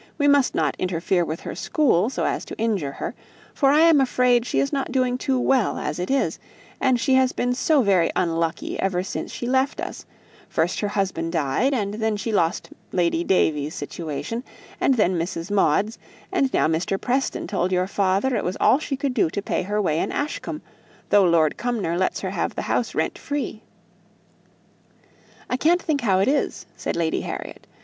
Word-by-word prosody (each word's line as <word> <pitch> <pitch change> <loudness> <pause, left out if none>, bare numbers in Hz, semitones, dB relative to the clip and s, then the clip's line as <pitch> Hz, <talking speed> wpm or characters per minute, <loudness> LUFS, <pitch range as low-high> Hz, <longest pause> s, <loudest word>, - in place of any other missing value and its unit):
We 290 -2 +2
must 285 -2 +4
not - - +1
interfere 180 0 0
with 160 0 -4
her - - -6
school 215 - +2
so - - -2
as - - -1
to - - -8
injure 205 -11 -1
her, - - -5 0.4
for 275 - +3
I 295 +3 +5
am 325 -4 +6
afraid 250 -2 +2
she - - 0
is 275 - 0
not 275 -2 -1
doing 255 -1 +1
too 260 0 0
well 255 -2 +2
as 150 +3 -3
it 180 - -3
is; 275 0 0 0.4
and 260 -2 +2
she 265 +3 +1
has 260 -1 +4
been 245 0 0
so 280 +2 +2
very 190 -5 +3
unlucky 165 -1 -1
ever 185 -2 0
since - - -5
she - - -5
left 260 +2 +1
us - - -6 0.4
first - - 0
her 205 - 0
husband 185 -5 -2
died, 165 - +1
and 205 -4 -1
then 220 0 -1
she 225 +2 -3
lost 170 -5 0 0.2
Lady 170 -2 +1
Davies' 155 -5 +1
situation, 170 - -5 0.4
and 270 - +3
then 185 -6 +2
Mrs. 165 +2 -4
Maude's, 205 +2 +2 0.3
and 275 -8 +1
now - - +2
Mr. 170 +5 -1
Preston 260 +2 -1
told 185 -2 -1
your 180 0 +2
father 200 +6 +1
it 210 - -1
was 180 - -2
all 260 - +4
she 280 -3 -3
could 275 -1 -1
do 215 -9 +2
to 200 - -3
pay 200 - -1
her 205 +3 -2
way 160 -6 +1
in - - -1
Ashcombe, 295 +1 -4 0.5
though 205 -2 +6
Lord 165 -3 +3
Cumnor 225 -9 -1
lets 185 +1 0
her - - -3
have - - -2
the - - -3
house - - -1
rent - - -1
free." 285 -6 -4 1.9
"I 250 - -1
can't 335 +6 +3
think 310 -5 -1
how 195 -5 +2
it 195 - +2
is," 285 +2 0
said - - -3
Lady 165 -1 0
Harriet. - - -7
210 Hz, 195 wpm, -23 LUFS, 175-260 Hz, 1.9 s, am